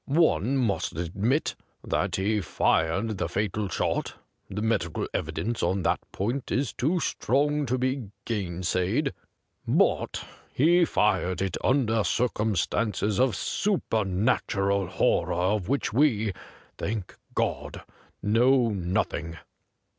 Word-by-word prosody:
One 140 - +2
must 115 - 0
admit 100 - 0 0.3
that - - 0
he 105 +2 +1
fired 95 +5 +1
the - - -1
fatal 105 0 -1
shot - - -1 0.2
— - - -45
the 105 +2 -3
medical 100 -8 0
evidence 115 0 -2
on 95 +2 0
that - - +2
point 120 +7 -2
is 130 0 0
too 165 +8 +1
strong 145 +1 +1
to 130 +2 +1
be 130 -3 -1 0.2
gainsaid 95 - -1 0.3
— - - -50
but - - +1 0.3
he 170 +5 +5
fired 95 - +1
it 95 -1 -1
under 115 -5 +2
circumstances 105 -2 0
of 130 -2 +3
supernatural 100 - 0
horror - - +1
of 95 +2 0
which 140 -5 0
we, 110 -7 +2 0.5
thank 105 -3 -3 0.2
God! - - -2 0.4
know 120 +3 +4
nothing.' 90 -4 -2
110 Hz, 115 wpm, -27 LUFS, 95-130 Hz, 0.5 s, he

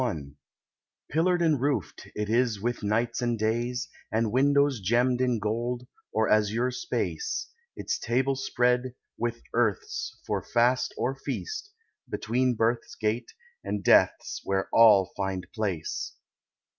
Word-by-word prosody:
XLI 75 - -3 0.8
"Pillared 175 +3 +2
and 155 -6 +2
roofed 135 - -1
it 105 0 -2
is 115 -1 +2
with 120 +3 -2
nights 115 +4 0
and 120 -1 0
days, 120 +3 -1 0.2
And 110 -1 +1
windows 140 +1 +3
gemmed 120 +5 +2
in 125 -2 +2
gold, 120 +4 -2 0.3
or 110 0 +1
azure 110 +4 +2
space, 425 - -3 0.2
Its - - -2
table 130 +3 +1
spread, 125 -1 +1 0.2
with 120 0 -3
earth's, 445 0 -1
for - - -1
fast 120 +2 +2
or 130 - 0
feast, 410 - -5 0.4
Between 125 +2 0
Birth's 115 +2 0
gate 110 +3 -2 0.3
and 105 -2 -3
Death's - - +3
where 95 -1 0
all 105 -5 +6
find 95 -2 -2
place. 100 -8 -3
120 Hz, 130 wpm, -27 LUFS, 110-130 Hz, 0.8 s, all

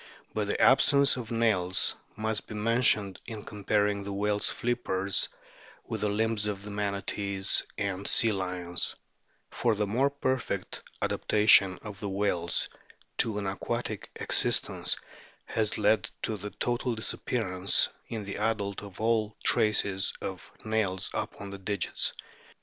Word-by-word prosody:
But 105 -2 -1
the - - -1
absence 140 +1 +5
of 120 -3 -6
nails 100 -6 +2 0.2
must 110 0 -2
be 110 - -7
mentioned 105 -3 +2
in 110 -3 -7
comparing 105 -1 0
the 100 - -5
whale's 105 +1 +1
flippers 100 -5 0 0.6
with - - -4
the 105 - +1
limbs 110 0 0
of 100 -1 -4
Manatees 100 -1 -1 0.2
and 100 -1 -2
Sea 115 - +4
lions; 90 -3 -2 0.6
for 115 -2 +1
the 105 0 0
more 125 +8 +2
perfect 130 -3 -2 0.2
adaptation 105 -3 +5
of 105 -3 -8
the 100 - -4
whales 95 -4 0 0.5
to 110 -2 +2
an 100 - -3
aquatic 95 0 -3
existence - - +2 0.5
has 110 -1 -1
led 110 +1 +2
to 110 - 0
the 105 +1 -6
total 120 +2 -1
disappear 110 -1 -2
ance 90 +2 +4 0.2
in 110 -2 -4
the 100 0 -5
adult 105 -2 -1
of 100 -3 -11
all 110 -1 +1
traces 100 -2 +3
of 95 -2 -6
nails 105 -4 0
upon 100 -1 -5
the 100 - -6
digits. 100 +1 -1
105 Hz, 135 wpm, -29 LUFS, 100-110 Hz, 0.6 s, absence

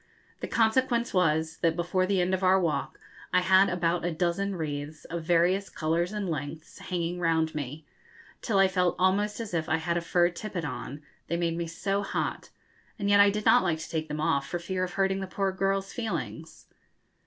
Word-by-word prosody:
The - - -4
consequence 235 +1 +2
was 160 -3 +1
that, 165 -1 +1
before 180 +2 0
the 195 -2 +2
end 180 +1 0
of 190 - 0
our 190 0 +4
walk, 165 -4 -2 0.3
I 180 - +4
had 190 +2 +5
about 175 -1 0
a 175 - 0
dozen 180 +4 -1
wreaths, 155 -1 -5
of 170 -1 -5
various 175 +4 +2
colours 170 +3 -1
and 210 -2 -3
lengths, 155 0 -5
hanging 175 -1 -3
round 160 -2 +1
me, 150 +1 -5 0.6
till 215 -5 0
I 195 0 +6
felt 180 -2 +1
almost 205 +4 +1
as 225 -5 -6
if 160 -1 -1
I 160 - +3
had 170 +1 -1
a - - 0
fur 175 +1 +2
tippet 175 -2 -5
on, 145 +1 -6 0.2
they 170 - -1
made 170 -1 0
me 170 0 -3
so 195 +4 -1
hot; 200 - -3 0.5
and 200 -2 0
yet 200 - +6
I 200 0 +7
did 210 +1 -3
not - - +6
like 175 -4 0
to 160 - -8
take 160 -1 -2
them 150 0 -4
off 140 -2 +1
for 175 - -2
fear 185 +2 -3
of 180 0 -4
hurting 195 0 +1
the 190 - -4
poor 195 +1 -1
girls' 195 +1 -1
feelings. 170 -8 -5
175 Hz, 205 wpm, -28 LUFS, 160-195 Hz, 0.6 s, I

